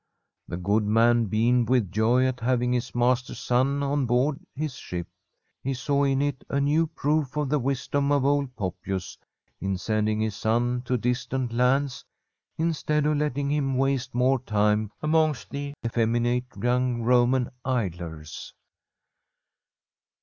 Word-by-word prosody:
The 85 - -4
good 100 +4 +1
man 115 +2 +3
beamed 115 +3 +2
with 125 -8 +2
joy 120 +4 +3
at 130 -1 -1
having 125 +1 +1
his 120 -1 -2
master's 125 +1 +1
son 135 +3 +1
on 140 -2 0
board 130 +5 +1 0.2
his 150 -1 -3
ship. 90 -8 -6 0.6
He 135 +1 -2
saw 140 +2 +1
in 135 0 +2
it 145 -2 -2
a 140 - 0
new 150 +4 +2
proof 150 -1 -1
of 150 -3 0
the 150 +1 +2
wisdom 140 +2 -1
of 140 -2 +2
old 140 -2 +1
Poppius, 95 -2 -4 0.4
in 95 0 -2
send 110 +2 0
ing 110 0 0
his 110 -2 -1
son 120 +3 0
to 125 +1 +1
distant 125 +1 -2
lands, 125 +2 +1 0.5
instead 155 -2 0
of 150 0 +2
letting 145 -1 -1
him 135 -3 0
waste 135 -2 0
more 130 +2 +3
time 105 -2 +1
amongst 155 -2 +1
the 140 0 -5
effeminate 120 +2 +1
young 125 -1 +1
Roman 125 +1 +3
idlers. 85 - -4
125 Hz, 145 wpm, -26 LUFS, 115-140 Hz, 0.6 s, man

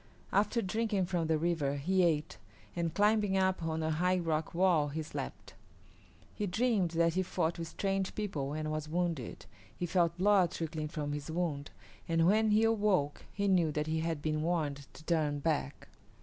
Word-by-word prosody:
After 215 +3 +2
drinking 210 0 0
from 175 -3 -1
the 160 -1 +2
river 155 -4 0
he 185 +7 +1
ate 155 -4 0 0.4
and, 170 -1 -1
climbing 205 +1 +2
up 190 -1 +1
on 160 -1 -2
a 160 - 0
high 180 +4 +2
rock 160 -2 -1
wall, 175 -5 +3
he 155 +2 -4
slept. 155 - -7 0.8
He 210 - -2
dreamed 210 -1 +1
that 170 0 +3
he 185 - +1
fought 175 -2 -1
with 165 - -4
strange 195 +2 -2
people 150 -10 -3
and 155 0 -3
was 155 0 -3
wounded. 170 -6 -2 0.3
He 175 - -2
felt 170 -1 +1
blood 190 -1 +4
trickling 160 -2 -4
from 150 -1 -4
his 145 +1 -5
wounds, 160 -4 -2 0.4
and 165 0 +3
when 215 +4 +4
he 210 +1 +4
awoke 205 -10 +1
he 200 -1 -1
knew 175 -5 +3
that 150 0 -1
he 160 +1 -1
had 160 -2 -2
been 155 0 0
warned 150 -4 -1
to - - -13
turn 155 -3 +1
back. 145 -1 -2
170 Hz, 180 wpm, -32 LUFS, 155-190 Hz, 0.8 s, blood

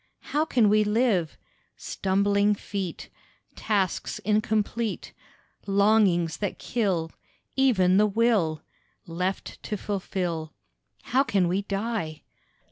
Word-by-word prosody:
How 300 +2 +2
can 245 -8 +3
we 215 +1 +4
live? 210 -6 +1 0.4
Stumbling 200 +2 +1
feet, 195 -3 -5 0.5
Tasks 195 -4 -1
incomplete, 215 +1 -1 0.5
Longings 195 -5 +3
that 205 -3 -3
kill 185 -9 -1 0.4
Even 195 -9 +4
the 210 +1 +5
will, 200 -8 +1 0.4
Left 180 +3 -4
to 210 - -4
fulfil, 180 -6 -3 0.5
How 260 - +2
can 195 -9 +1
we 185 +3 0
die? 200 -5 -3
200 Hz, 100 wpm, -26 LUFS, 180-215 Hz, 0.5 s, the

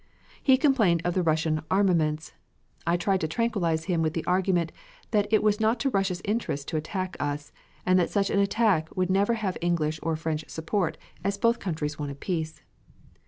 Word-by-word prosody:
He 265 -2 +5
complained 220 - +3
of 175 - +1
the 185 - +1
Russian 155 -1 +1
armaments. 165 -6 +1 0.5
I 170 +1 +3
tried 190 +1 +1
to 160 - 0
tranquilize 170 -5 0
him 170 -2 0
with 155 -1 0
the 165 - -2
argument 180 -2 +1 0.4
that 205 -1 +1
it 215 - +4
was 210 0 +3
not 220 +2 +2
to 275 - +1
Russia's 195 -3 0
interest 205 -10 -2
to - - -4
attack 185 +4 -3
us, 145 0 -3 0.3
and 185 0 +4
that 175 - +1
such 200 -1 +1
an 200 - +2
attack 200 -5 +2
would 185 0 +1
never 200 +4 +3
have 205 -5 -2
English 160 -3 0
or 165 0 0
French 155 -1 -2
support, 165 0 -1 0.3
as 200 0 0
both 230 +2 +2
countries 155 -5 -3
wanted 140 -1 -5
peace. 160 -4 -3
180 Hz, 185 wpm, -27 LUFS, 160-200 Hz, 0.5 s, He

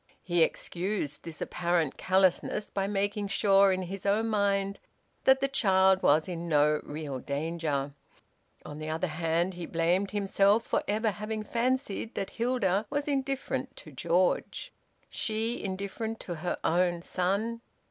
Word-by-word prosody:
He 175 -2 +1
excused 170 -2 -1
this 165 -2 -9
apparent 170 -4 0
callousness 190 +2 +1
by 195 -1 -1
making 205 0 -1
sure 195 -1 +4
in 185 0 -1
his 190 +2 -6
own 215 +3 +1
mind 200 -2 +1 0.5
that 265 0 +5
the 275 - +3
child 190 -7 +3
was 155 +2 +4
in 170 -1 -5
no 150 0 +3
real 145 -3 -5
danger. 145 -1 -2 0.7
On 145 - -8
the 155 0 -5
other 160 +3 -1
hand 165 +2 0
he 175 -2 -6
blamed 175 +4 +1
himself 200 +1 +2
for - - +1
ever 215 +2 +1
having 215 +1 -4
fancied 235 -1 -1
that 195 - -3
Hilda 225 -4 0
was 290 0 -2
indifferent 270 -1 -2
to 155 - -12
George. 175 +7 0 0.3
She, 225 +2 -2
indifferent 200 +4 -4
to 175 - -5
her 170 +2 -3
own 175 0 +1
son! 200 +7 -1
195 Hz, 145 wpm, -29 LUFS, 170-215 Hz, 0.7 s, that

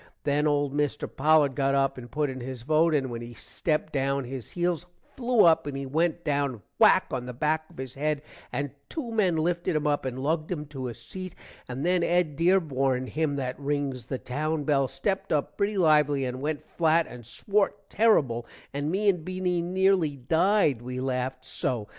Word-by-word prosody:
then 150 +1 +2
old 145 -2 +1
mister 145 -1 0
Pollard 150 -1 +3
got 135 0 +1
up 135 0 +2
and 120 -1 -9
put 150 +3 0
in 130 -1 -5
his 125 -1 -6
vote 155 +3 +3
and 135 -3 0
when 115 0 -5
he 120 0 -9
stepped 155 +5 -2
down 135 0 0
his 125 -2 -6
heels 175 -1 -1 0.3
flew 245 -3 +3
up 165 -2 +4
and 140 -1 -3
he 135 - -4
went 160 +5 0
down 140 -6 -1 0.2
whak - - +6
on 125 - -3
the 125 - -5
back 155 +4 0
of - - -18
his 130 -1 -6
head 150 +1 -1 0.3
and 140 +2 -2 0.2
2 270 -8 -4
men 200 -6 +2
lifted 170 +1 0
him 155 0 0
up 145 -1 +1
and 130 -1 -4
lugged 155 +4 -1
him 150 -4 -3
to 135 -3 -6
a 120 - -6
seat, 185 - -8 0.3
and 130 +4 -4
then 180 0 +3
Ed 170 -3 +1
Derborn, 135 -7 +2
him 155 -2 0
that 130 -1 -3
rings 140 -4 -2
the 130 - -2
town 150 +6 -2
bell, 140 -2 +2
stepped 195 +7 -2
up 150 -2 0
pretty 200 +1 0
lively 150 -5 +4
and 130 +1 -4
went 150 0 -2
flat 165 0 +2
and 125 -1 -10
swort 200 - 0
terrible, 135 - +2 0.3
and 145 +2 -2
me 200 +5 0
and 180 -5 +3
Beany 185 0 -1
nearly 185 -3 +2
died 160 - +2
we 125 +1 -5
laffed 130 0 -2
so. 120 -6 -2
145 Hz, 195 wpm, -27 LUFS, 130-170 Hz, 0.3 s, whak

